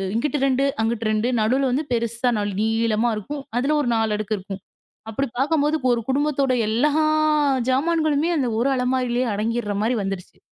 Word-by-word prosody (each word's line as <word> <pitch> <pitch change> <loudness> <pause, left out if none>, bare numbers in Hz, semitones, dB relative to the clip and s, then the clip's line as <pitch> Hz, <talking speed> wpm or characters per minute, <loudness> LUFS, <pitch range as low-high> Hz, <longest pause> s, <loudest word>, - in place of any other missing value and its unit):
இங்கிட்டு 290 +5 0
2, 270 +1 +2 0.2
அங்கிட்டு 225 0 -1
2 215 +3 0
நடுவுல 255 +5 +2
வந்து 285 +5 0
பெருசா 235 +1 0
நல் 205 -1 -2
நீளமா 225 +1 +1
இருக்கும். 280 +8 -5 0.2
அதுல 275 +5 +1
ஒரு 245 - -1
4 225 -1 +1
அடுக்கு 215 0 -2
இருக்கும். 195 0 -8 0.5
அப்பபிடி 270 +4 -2
பார்க்கும்போது 295 +2 +2 0.2
ஒரு 235 -1 +1
குடும்பத்தோட 280 -1 +1 0.2
எல்லா 245 +7 +2 0.8
சாமான்களுமே 310 +2 +1
அந்த 255 -4 0
ஒரு 255 - +1
அலமாரியிலே 250 -1 0
அடங்கிர்றமாரி 220 +1 -1
வந்துருச்சு. 195 -2 -6
245 Hz, 150 wpm, -22 LUFS, 220-275 Hz, 0.8 s, 2